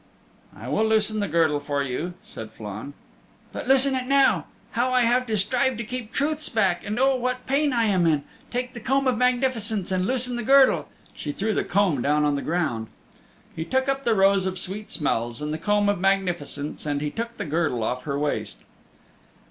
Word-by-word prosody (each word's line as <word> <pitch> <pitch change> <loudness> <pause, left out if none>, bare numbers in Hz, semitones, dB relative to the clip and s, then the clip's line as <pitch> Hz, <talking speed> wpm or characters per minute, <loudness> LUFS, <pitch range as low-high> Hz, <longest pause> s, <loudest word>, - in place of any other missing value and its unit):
"I - - -9
will 220 - +1
loosen 215 0 +1
the 205 - 0
girdle 160 -3 +2
for 145 -1 -2
you," 155 +7 -4
said 110 -1 -8
Flann. 105 +7 -7 0.6
"But - - -6
loosen 270 +1 +4
it 255 -1 -2
now. 275 0 +3 0.3
How 245 +2 0
I 255 0 +4
have 245 +2 +2
to 220 -1 0
strive 250 +5 +1
to 235 - -3
keep 235 -1 -6
truths 305 +3 0
back, 190 -6 +1
and 215 +3 -3
oh, 270 0 +4
what 255 0 -2
pain 280 +2 +1
I 235 -2 +2
am 185 -5 +2
in! 150 -3 +2 0.3
Take 250 +1 -3
the 240 - -7
Comb 270 +4 +1
of 255 -2 +2
Magnificence, 240 -5 +1
and 185 0 0
loosen 250 -1 0
the - - -2
girdle." 270 +2 +5 0.3
She 150 - -5
threw 215 +8 -1
the - - 0
comb 185 -9 +1
down 150 +3 +2
on 145 - +2
the 140 - -1
ground. 155 -10 -1 0.7
He 160 - -3
took 260 +9 0
up 275 0 0
the 230 -3 +2
Rose 195 -1 +4
of 185 0 -3
Sweet 195 +4 -4
Smells 120 -6 -1
and 150 0 -3
the 155 - -4
Comb 205 +3 +2
of 205 -3 +1
Magnificence 175 -7 -1
and 145 -1 0
he 150 0 -3
took 235 +1 -5
the - - -4
girdle 155 -6 0
off 125 +3 -2
her 140 -2 -2
waist. 145 0 -3
205 Hz, 205 wpm, -24 LUFS, 155-250 Hz, 0.7 s, girdle